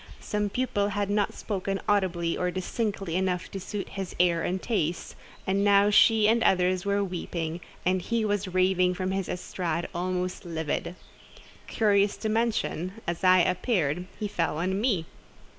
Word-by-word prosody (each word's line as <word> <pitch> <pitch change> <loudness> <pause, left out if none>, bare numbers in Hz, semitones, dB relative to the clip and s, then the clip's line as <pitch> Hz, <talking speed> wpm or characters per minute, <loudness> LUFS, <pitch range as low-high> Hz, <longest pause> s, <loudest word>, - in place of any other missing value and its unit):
Some 210 -1 -2
pupil 205 -3 0
had 205 0 -1
not 205 0 +1
spoken 195 -1 -3
audibly 180 -5 +1
or 180 - 0
distinctly 195 -1 -3
enough 185 -1 -1
to 195 - -5
suit 195 +1 -5
his 195 -2 -6
ear 175 -2 +3
and 185 +3 -1
taste, 175 -7 -2 0.3
and 195 +1 +1
now 200 0 +5
she 215 0 +6
and 230 +2 +3
others 185 -1 +2
were 200 0 +2
weeping, 170 -2 -4 0.2
and 185 +1 +2
he 230 +3 -1
was 205 -1 0
raving 185 0 +2
from 185 0 -2
his 195 -1 -2
estrade, 175 -2 -3
almost 180 +1 -2
livid. 165 0 -3 0.7
Curious 205 -2 +2
to 220 - -3
mention, 215 -5 0
as 170 +1 -3
I 185 0 +6
appeared, 180 - 0
he 210 - -1
fell 170 -5 -1
on 190 +4 -1
me. 200 -9 +1
185 Hz, 160 wpm, -27 LUFS, 180-205 Hz, 0.7 s, she